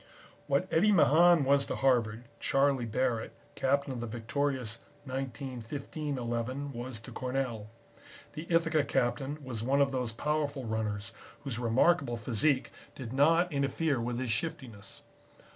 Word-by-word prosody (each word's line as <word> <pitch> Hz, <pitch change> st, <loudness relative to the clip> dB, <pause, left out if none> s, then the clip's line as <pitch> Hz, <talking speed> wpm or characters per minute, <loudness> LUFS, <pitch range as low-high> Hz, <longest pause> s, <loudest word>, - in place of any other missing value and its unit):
What 140 Hz, +7 st, +1 dB
Eddie 205 Hz, +6 st, +5 dB
Mahan 170 Hz, -2 st, +6 dB
was 140 Hz, +1 st, +4 dB
to -, -, -2 dB
Harvard, 120 Hz, -4 st, +1 dB, 0.2 s
Charlie 135 Hz, -3 st, +2 dB
Barrett, 115 Hz, 0 st, -1 dB, 0.2 s
Captain 140 Hz, +1 st, 0 dB
of 125 Hz, -, -5 dB
the 120 Hz, -, -4 dB
victorious 120 Hz, +1 st, -2 dB, 0.3 s
1915 135 Hz, +2 st, -5 dB
Eleven, 125 Hz, +4 st, -3 dB
was 120 Hz, -1 st, -6 dB
to -, -, -10 dB
Cornell. 125 Hz, -5 st, -3 dB, 0.6 s
The 155 Hz, +2 st, -7 dB
Ithaca 165 Hz, -3 st, +3 dB
Captain 135 Hz, +1 st, -1 dB
was 125 Hz, -4 st, -5 dB
one 135 Hz, +4 st, +2 dB
of 140 Hz, -1 st, +3 dB
those 125 Hz, -3 st, -1 dB
powerful 145 Hz, +2 st, -2 dB
runners 105 Hz, -3 st, -3 dB, 0.3 s
whose 130 Hz, -5 st, -4 dB
remarkable 125 Hz, +2 st, +2 dB
physique 130 Hz, +5 st, +1 dB, 0.2 s
did 125 Hz, -3 st, -7 dB
not 165 Hz, +5 st, +4 dB
interfere 140 Hz, 0 st, 0 dB
with 120 Hz, +1 st, -2 dB
his 125 Hz, -2 st, -2 dB
shiftiness. 110 Hz, -5 st, -5 dB
130 Hz, 135 wpm, -31 LUFS, 120-145 Hz, 0.6 s, Mahan